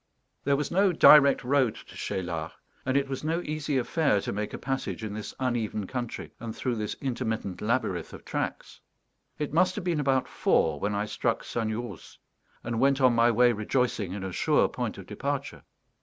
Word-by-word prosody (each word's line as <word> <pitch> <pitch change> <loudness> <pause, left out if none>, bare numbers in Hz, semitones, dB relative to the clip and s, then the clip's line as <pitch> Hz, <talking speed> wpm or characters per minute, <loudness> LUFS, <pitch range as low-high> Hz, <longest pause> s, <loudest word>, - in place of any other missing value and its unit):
There 140 0 +3
was 145 0 -2
no 195 +2 +4
direct 150 -5 +7
road 130 -3 +2
to - - -13
Cheylard, 85 -4 -3 0.3
and 130 +1 +2
it 140 0 +1
was 135 +1 -5
no 165 +2 0
easy 150 -2 -2
affair 140 -2 +2
to - - -3
make 105 +1 -3
a - - -5
passage 135 -3 -3
in 105 -2 -4
this 105 0 -6
uneven 115 -5 -1
country 120 +3 -5
and 115 -2 -6
through 125 -3 -2
this 105 -1 -3
intermittent 115 -7 -3
labyrinth 105 -7 -1
of - - -11
tracks. - - -4 0.6
It 150 -1 -3
must 185 +3 +3
have 210 - -4
been 170 -3 0
about 135 -2 +1
four 75 -3 +1
when 105 +4 -1
I 105 +1 0
struck 115 +2 -1
Sagnerousse, 115 +1 -4 0.5
and 115 -1 -2
went 135 +1 +3
on 130 -2 +5
my 115 0 +4
way 120 +1 +5
rejoicing 110 -2 -1
in 100 -1 -5
a 95 - -4
sure - - +3
point - - -4
of - - -9
departure. - - -4
120 Hz, 185 wpm, -28 LUFS, 105-140 Hz, 0.6 s, direct